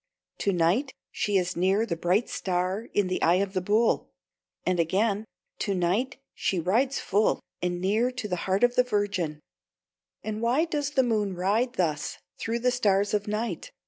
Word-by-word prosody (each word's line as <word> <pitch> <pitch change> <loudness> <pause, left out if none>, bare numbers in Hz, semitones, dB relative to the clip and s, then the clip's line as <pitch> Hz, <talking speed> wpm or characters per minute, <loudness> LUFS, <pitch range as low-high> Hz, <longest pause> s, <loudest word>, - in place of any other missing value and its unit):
"To 200 - +1
night 185 - +1 0.2
she 205 -1 0
is 180 -1 -1
near 190 +5 +2
the 180 -7 -2
bright 180 +7 +1
star 185 +4 -2
in 205 - +2
the 185 - -2
eye 170 +2 +4
of 195 +1 0
the 185 - 0
Bull." 215 +5 +2 0.6
And 180 -1 +1
again: 200 +5 +1 0.3
"To 200 - 0
night 195 +10 0 0.2
she 185 - -1
rides 235 - +1
full, 205 +3 +2 0.2
and 175 0 -1
near 215 +7 +2
to 250 -4 -5
the 180 - -1
heart 190 +4 +2
of 245 0 +5
the 250 - +4
Virgin." 200 -9 -1 0.8
And 215 0 -4
why 250 +8 +2
does 295 -4 -2
the 270 -3 +2
moon 210 -5 0
ride 210 +8 +1
thus 155 -8 -1 0.2
through 230 +1 -2
the 250 +1 +3
stars 205 -5 +2
of 205 0 0
night? 210 -3 -3
205 Hz, 175 wpm, -27 LUFS, 185-235 Hz, 0.8 s, of